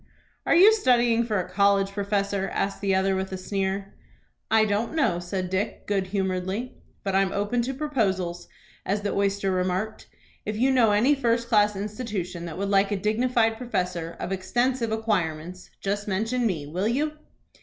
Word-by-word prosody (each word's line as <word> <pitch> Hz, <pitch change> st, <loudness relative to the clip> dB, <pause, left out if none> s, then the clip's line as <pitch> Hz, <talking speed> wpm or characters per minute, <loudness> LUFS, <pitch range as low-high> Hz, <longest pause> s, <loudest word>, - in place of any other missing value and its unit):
"Are -, -, +4 dB
you 395 Hz, +6 st, +8 dB
studying 240 Hz, -, +3 dB
for 215 Hz, -4 st, -1 dB
a 180 Hz, -, -3 dB
college 195 Hz, +1 st, +2 dB
professor?" 200 Hz, -1 st, -1 dB
asked 195 Hz, -, -2 dB
the 195 Hz, -1 st, +2 dB
other, 190 Hz, 0 st, +2 dB
with 190 Hz, 0 st, -3 dB
a 190 Hz, -, -3 dB
sneer. 195 Hz, +1 st, -3 dB, 0.6 s
"I 220 Hz, -1 st, +4 dB
don't 215 Hz, +7 st, -1 dB
know," 185 Hz, -, +2 dB
said 180 Hz, +1 st, -4 dB
Dick, 190 Hz, +2 st, -2 dB
good 195 Hz, -2 st, 0 dB
humoredly; 190 Hz, +4 st, -2 dB, 0.3 s
"but 195 Hz, -, -2 dB
I'm 195 Hz, 0 st, +2 dB
open 205 Hz, +5 st, 0 dB
to 255 Hz, +3 st, -2 dB
proposals, 195 Hz, -, -1 dB, 0.4 s
as 205 Hz, +2 st, -1 dB
the 205 Hz, -, -1 dB
oyster 200 Hz, -1 st, 0 dB
remarked. 185 Hz, +4 st, -2 dB, 0.4 s
If 210 Hz, 0 st, -3 dB
you 260 Hz, +4 st, +3 dB
know 240 Hz, -5 st, +4 dB
any 225 Hz, +8 st, +4 dB
first 235 Hz, -3 st, 0 dB
class 210 Hz, -2 st, +4 dB
institution 200 Hz, -4 st, -4 dB
that 165 Hz, -1 st, -6 dB
would 200 Hz, +1 st, -2 dB
like 195 Hz, 0 st, +3 dB
a 205 Hz, -, -1 dB
dignified 225 Hz, +2 st, +1 dB
professor, 180 Hz, -8 st, -3 dB
of 180 Hz, -, -4 dB
extensive 235 Hz, +5 st, 0 dB
acquirements, 180 Hz, -6 st, -2 dB
just 205 Hz, +1 st, -2 dB
mention 225 Hz, +5 st, 0 dB
me, 160 Hz, -8 st, -2 dB
will 180 Hz, +8 st, -2 dB
you?" 300 Hz, +6 st, -1 dB
200 Hz, 170 wpm, -25 LUFS, 190-230 Hz, 0.6 s, you